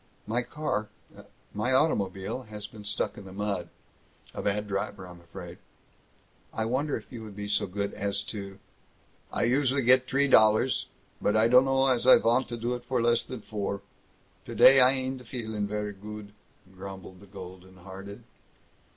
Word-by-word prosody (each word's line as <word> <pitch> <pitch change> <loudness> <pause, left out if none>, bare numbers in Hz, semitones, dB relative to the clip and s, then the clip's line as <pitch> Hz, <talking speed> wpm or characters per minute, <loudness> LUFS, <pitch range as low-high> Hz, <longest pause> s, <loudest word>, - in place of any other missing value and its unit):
"My 115 +3 0
car 120 -4 -3 0.6
my 120 +5 0
automobile 105 - +1
has 105 -1 -5
been 105 0 -11
stuck 105 0 0
in 100 - -11
the 95 - -10
mud. 100 -3 -3 0.6
A - - -5
bad 105 +1 -1
driver, 100 -1 -3
I'm 90 -1 -12
afraid! 85 0 -10 0.9
I 110 - -2
wonder 135 +5 0
if 110 - -13
you 115 -3 -7
would 105 -2 -10
be 105 0 -5
so 105 -1 +1
good 100 +2 -3
as 100 0 -1
to 100 -2 -6 0.4
" - - -35
"I - - -1
usually 135 +2 +2
get 130 +1 +5
t'ree 140 +2 +2
dollars, 110 +1 +4 0.3
but 105 - +2
I 110 +1 +5
dunno 135 +2 +5
as 130 -2 +2
I 130 - +10
vant 120 +3 +2
to 120 - -4
do 120 +2 -2
it 120 -1 -5
for 125 0 -1
less 120 0 +3
than 125 -4 -8
four. 100 -2 -4 0.6
Today 135 0 +6
I 125 0 +8
ain'd 130 -2 -3
feelin' 110 -4 -3
very 105 0 -3
goot," 105 +1 -9 0.4
grumbled 95 -1 -9
the 100 - -15
golden 95 -1 -11
hearted. 95 +2 -10
105 Hz, 170 wpm, -28 LUFS, 100-125 Hz, 0.9 s, I